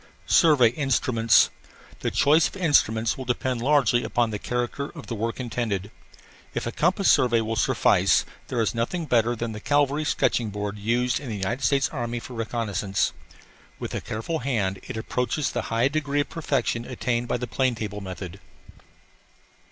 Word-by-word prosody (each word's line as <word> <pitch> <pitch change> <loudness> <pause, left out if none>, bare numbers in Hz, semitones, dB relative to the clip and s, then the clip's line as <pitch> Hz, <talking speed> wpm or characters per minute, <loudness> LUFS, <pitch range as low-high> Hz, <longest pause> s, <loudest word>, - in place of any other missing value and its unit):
SURVEY 140 - +5
INSTRUMENTS 120 -4 +3 0.5
The - - -1
choice 150 +3 +4
of - - -10
instruments 115 - +2
will 130 - -5
depend 125 0 -1
largely 130 -3 +3
upon 120 -2 0
the 105 - -3
character 125 +5 -3
of 160 - -9
the - - -5
work 115 +2 -3
intended. 110 -5 -3 0.6
If - - -2
a - - -2
compass - - +1
survey 120 -2 +4
will 110 0 -2
suffice, - - +3 0.2
there 125 - -2
is 110 - 0
nothing 125 +9 -2
better 120 -3 +2
than 115 0 -3
the 105 - -6
cavalry 145 +4 +1
sketching 120 -6 +1
board 105 0 -4
used 120 +4 +1
in 140 - -7
the 110 - -3
United 100 +7 -2
States 140 -1 +3
Army 120 -4 -3
for 125 - -10
reconnaissance. 105 -4 -1 0.6
With - - -6
a - - -2
careful 115 +10 -3
hand 105 -7 -1
it - - -5
approaches 125 +5 -1
the - - -2
high 115 +3 +2
degree 145 0 0
of 140 - -5
perfection 140 -7 -1
attained 120 -1 -2
by - - 0
the 125 - -4
plane 125 +1 0
table 105 -2 -5
method. 95 0 -7
120 Hz, 170 wpm, -25 LUFS, 110-135 Hz, 0.6 s, SURVEY